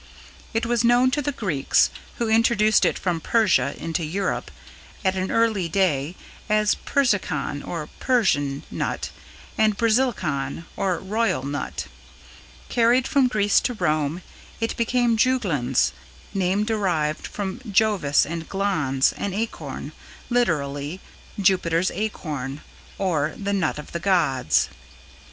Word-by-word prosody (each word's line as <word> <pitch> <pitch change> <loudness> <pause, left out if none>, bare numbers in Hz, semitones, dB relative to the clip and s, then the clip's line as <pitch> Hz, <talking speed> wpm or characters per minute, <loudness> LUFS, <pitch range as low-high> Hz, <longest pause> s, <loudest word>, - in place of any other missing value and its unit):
It 225 +1 0
was 235 0 +1
known 245 +2 +4
to 295 +2 0
the 290 - -1
Greeks, 185 - +2 0.3
who 235 - -1
introduced 220 -1 +4
it - - +1
from 175 -3 -1
Persia 210 -11 +2
into 165 0 -3
Europe 185 +6 -2 0.6
at 190 0 +2
an 185 0 -2
early 220 -7 +1
day, 165 -4 +1 0.3
as 215 0 +3
"Persicon" 205 - 0
or 160 -2 -5
"Persian" 145 - +1
nut - - -3 0.5
and 215 -2 +3
"Basilicon" 220 - 0
or 185 -3 0
"Royal" 210 - 0
nut. 140 +1 -4 0.8
Carried 240 +2 +3
from 275 -2 +3
Greece 205 -4 +3
to 245 - -2
Rome, 155 -2 0 0.4
it 225 0 -1
became 235 0 +2
"Juglans" 190 - +2 0.4
(name 190 +1 +1
derived 180 -9 -1
from 200 +2 -4
Jovis 195 -9 +3
and 165 +1 -5
glans, 155 -10 +1
an 195 -2 -3
acorn; 155 -10 -4 0.4
literally 150 -8 0 0.4
"Jupiter's 185 -3 +2
Acorn", 155 -9 -4 0.4
or 160 -6 0
"the 200 0 -2
Nut 180 -7 0
of 150 - -9
the 170 - -3
Gods"). 160 - +2
190 Hz, 125 wpm, -24 LUFS, 155-225 Hz, 0.8 s, known